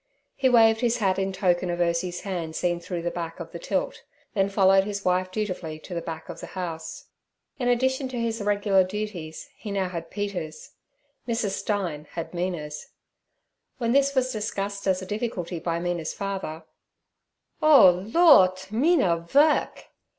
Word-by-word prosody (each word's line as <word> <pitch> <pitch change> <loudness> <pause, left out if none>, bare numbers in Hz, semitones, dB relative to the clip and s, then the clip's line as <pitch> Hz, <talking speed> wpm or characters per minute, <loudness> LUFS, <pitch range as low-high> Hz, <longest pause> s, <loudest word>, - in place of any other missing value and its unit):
He 265 -1 +2
waved 225 -2 +5
his 240 -1 +2
hat 195 -3 +1
in 195 0 -1
token 185 -1 +1
of 175 - -1
Ursie's 175 +1 0
hand 170 -5 -4
seen 175 -1 0
through 170 0 -5
the 175 - -1
back 170 -1 -5
of - - -7
the - - -7
tilt, - - -2 0.3
then 195 -3 +1
followed 195 -1 +4
his 200 0 -5
wife 185 0 +1
dutifully 185 -6 -4
to 180 - -10
the 170 - -2
back 160 -1 -7
of - - -8
the - - -8
house. 165 -3 -5 0.5
In 245 - -1
addition 260 +2 +1
to 255 -2 -5
his 230 -1 -2
regular 205 -1 +3
duties 185 - -6
he 220 - -8
now 195 -2 -1
had 170 -2 -6
Peter's—Mrs. 205 +4 -5
Stein 180 -7 -3
had 165 +1 -5
Mina's. 170 -4 -4 0.9
When 235 -2 0
this 275 +1 +3
was 255 -1 +2
discussed 200 -2 -3
as 185 0 +1
a - - -6
difficulty 190 -5 -3
by 170 0 -2
Mina's 170 -2 -3
father, 195 -5 -4 1.0
'Oh, 190 - +7
Lordt! 190 - +5
Mina 235 - +3
vork!' 285 - +2
190 Hz, 160 wpm, -25 LUFS, 175-220 Hz, 1.0 s, Oh